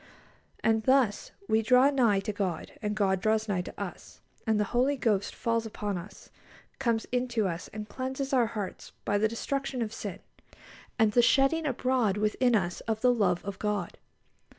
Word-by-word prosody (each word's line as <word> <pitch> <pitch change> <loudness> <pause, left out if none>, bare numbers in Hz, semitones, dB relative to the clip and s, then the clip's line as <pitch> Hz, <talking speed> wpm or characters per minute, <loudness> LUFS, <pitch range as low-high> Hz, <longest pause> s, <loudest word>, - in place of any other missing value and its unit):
And 225 0 +3
thus 260 -6 +3 0.2
we 220 0 +3
draw 255 +5 +5
nigh 230 -8 +3
to 210 +2 -3
God, 190 -5 -3
and 210 0 -2
God 190 -3 +1
draws 220 +1 +1
nigh 195 -4 0
to - - -9
us, - - -7 0.3
and 220 -1 +2
the - - +3
Holy 265 +4 +2
Ghost 210 -5 0
falls 230 -1 0
upon 210 -2 -3
us, 185 +3 -9 0.5
comes 235 -4 0
into 245 -4 0
us, 170 -1 -4
and 210 0 -7
cleanses 265 +3 -4
our 245 -3 +4
hearts 210 -4 -6
by 205 - +1
the 220 - +3
destruction 270 +3 -3
of 220 -1 -5
sin, 200 -4 -5 0.8
and 220 -3 +4
the 240 - +5
shedding 275 +6 +3
abroad 250 -6 +1
within 220 +4 +2
us 175 -4 0
of 220 -1 -1
the 250 -1 +5
love 185 -7 +1
of 200 -1 -5
God. 210 -1 -2
220 Hz, 175 wpm, -29 LUFS, 205-250 Hz, 0.8 s, draw